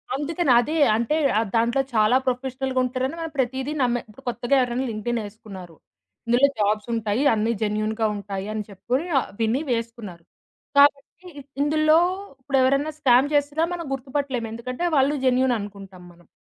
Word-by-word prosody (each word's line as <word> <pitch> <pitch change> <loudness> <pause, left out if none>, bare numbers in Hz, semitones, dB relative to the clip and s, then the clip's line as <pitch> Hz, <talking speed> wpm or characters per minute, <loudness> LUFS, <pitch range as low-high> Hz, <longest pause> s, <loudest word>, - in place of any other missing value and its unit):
అందుకని 295 +1 0
అదే 300 +7 -1 0.2
అంటే 235 +6 0 0.2
ఆ - - +2
దాంట్లో 235 +4 +2
చాలా 215 +3 +4
ప్రొఫెషనల్‌గా 260 +1 -2
ఉంటరని 255 +3 -2
మనం 325 -1 -5
ప్రతీదీ 265 +2 -1
నమ్మే 245 -1 +1
ఇపుడు 240 +6 -16
కొత్తగా 245 +3 0
ఎవరైనా 250 +1 -1
లింక్డ్ఇన్‌ 230 +2 -2
ఏసుకున్నారు. 195 -5 -11 0.5
ఇందులో 245 +4 +5
జాబ్సుంటాయి 215 +3 0
అన్నీ 220 +1 0
జెన్యూన్‌గా 215 +1 -1
ఉంటాయి. 200 -1 -5
అని 215 -1 -3
చెప్పుకొని 245 - -2
ఆ - - 0 0.2
విని 230 +5 +1
వేసుకున్నారు. 230 -7 -4 0.5
కాబట్టి 280 0 +5 0.6
ఇందులో 310 +1 +3 0.4
ఇప్పుడెవరన్నా 275 +2 +1
స్కామ్ 255 0 +4
చేసినా 290 +2 +1
మనం 340 -1 -5
గుర్తుపట్టలేం. 265 -2 -3
ఎందుకంటే 255 +8 -4
వాళ్ళు 275 +2 +3
జెన్యూన్ 255 -1 +3
అనుకుంటాం 195 -3 -10
మనం. 170 -1 -23
245 Hz, 140 wpm, -23 LUFS, 215-275 Hz, 0.6 s, ఇందులో